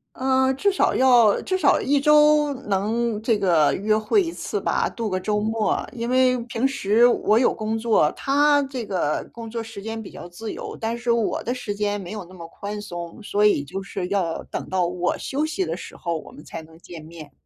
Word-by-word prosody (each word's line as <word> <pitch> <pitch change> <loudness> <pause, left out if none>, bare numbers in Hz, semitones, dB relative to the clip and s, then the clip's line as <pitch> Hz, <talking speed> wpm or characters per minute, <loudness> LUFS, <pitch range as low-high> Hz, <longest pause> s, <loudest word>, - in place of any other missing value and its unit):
呃， 265 0 +2
至 400 +8 +2
少 380 - +1
要 245 -5 +5
至 375 - -1
少 290 - +4
1 280 +1 +2
周 300 0 +5 0.2
能 215 +3 0
这 225 -1 +1
个 170 -7 +3
约 215 +2 +1
会 220 - +2
1 335 - -4
次 - - -4
吧， - - 0
度 230 -2 -4
个 185 - -1
周 210 +2 -1
末， 220 0 -1
因 235 0 -4
为 255 0 +4
平 240 +2 0
时 230 -3 +3
我 225 -2 +3
有 245 - +3
工 220 0 -3
作， 220 -9 +2
他 290 +1 +3
这 265 -3 -5
个 180 -7 -1
工 230 -1 -9
作 230 0 -4
时 225 -2 -9
间 225 +1 -5
比 205 - -9
较 - - -10
自 215 +6 -7
由， - - -7
但 225 +1 -2
是 235 0 -1
我 230 -3 0
的 245 - -2
时 220 -5 -5
间 205 0 -1
没 180 - -8
有 210 -4 -6
那 185 - -16
么 170 -2 -9
宽 205 +4 -7
松， 175 0 -8
所 210 0 +1
以 205 -9 +3
就 190 +7 -6
是 190 -2 -5
要 185 -4 -1
等 - - -6
到 185 -2 +1
我 180 0 -1
休 295 +3 -2
息 310 -11 -2
的 165 0 -3
时 - - -10
候， 170 -2 -3
我 - - -11
们 150 - -13
才 165 0 -8
能 160 +1 -17
见 170 -3 -11
面。 160 -3 -11
215 Hz, 235 characters per minute, -23 LUFS, 185-250 Hz, 0.2 s, 要